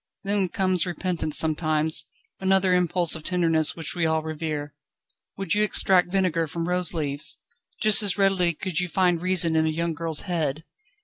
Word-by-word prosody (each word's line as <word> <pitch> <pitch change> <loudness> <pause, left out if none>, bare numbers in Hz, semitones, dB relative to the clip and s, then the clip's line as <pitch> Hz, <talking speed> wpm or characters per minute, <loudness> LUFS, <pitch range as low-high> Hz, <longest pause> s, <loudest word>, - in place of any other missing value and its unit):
Then 200 -2 0
comes 185 -1 +1
repentance 175 -3 +1
sometimes: 155 0 +1 0.3
another 190 -1 +2
impulse 180 -1 +2
of 160 - +1
tenderness 165 -3 +1
which 165 -2 -3
we 175 - -3
all 160 0 0
revere. 155 -2 -5 0.6
Would 195 0 -2
you 210 - +1
extract 185 -3 +2
vinegar 180 -4 0
from 165 +2 -5
rose 180 -1 -1
leaves? 145 -3 -3 0.5
Just 215 -1 +5
as 205 -2 +1
readily 190 -4 +2
could 185 0 -3
you 180 - -2
find 175 -1 +1
reason 180 -3 +2
in 160 0 +2
a - - +1
young 165 +1 -2
girl's 160 -1 -1
head. 160 -5 -3
170 Hz, 170 wpm, -24 LUFS, 160-185 Hz, 0.6 s, Just